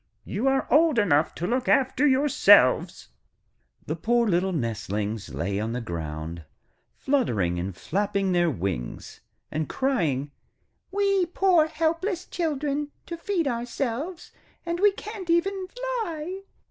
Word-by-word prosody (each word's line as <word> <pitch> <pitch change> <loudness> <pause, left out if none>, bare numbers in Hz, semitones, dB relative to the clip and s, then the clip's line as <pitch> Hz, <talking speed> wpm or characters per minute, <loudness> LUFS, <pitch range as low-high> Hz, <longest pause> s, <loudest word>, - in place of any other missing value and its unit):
You 225 +7 -2
are 270 0 +2
old 310 -2 +5
enough 160 -8 +2
to 175 - -3
look 250 +5 0
after 265 +2 +3
yourselves.' 260 - +4 0.8
The 155 - -2
poor 235 +7 +1
little 190 0 +1
nestlings 110 - -3
lay 100 +4 -2
on 110 +2 -2
the 125 - -2
ground, 80 -4 -5 0.5
fluttering 110 - 0
and 90 +1 -4
flapping 195 +1 -1
their 175 -1 +3
wings, 90 - -4 0.3
and 155 0 -2
crying: 155 - 0 0.6
'We, 395 -2 +1
poor 350 -3 +3
helpless 335 +4 -1
children, 295 -3 -2 0.2
to 340 - -5
feed 335 -2 -1
ourselves, 250 +7 -3 0.3
and 340 0 -2
we 410 +1 +5
can't 400 -2 -8
even 375 +3 +1
fly! 390 -7 -4
250 Hz, 125 wpm, -26 LUFS, -, 0.8 s, old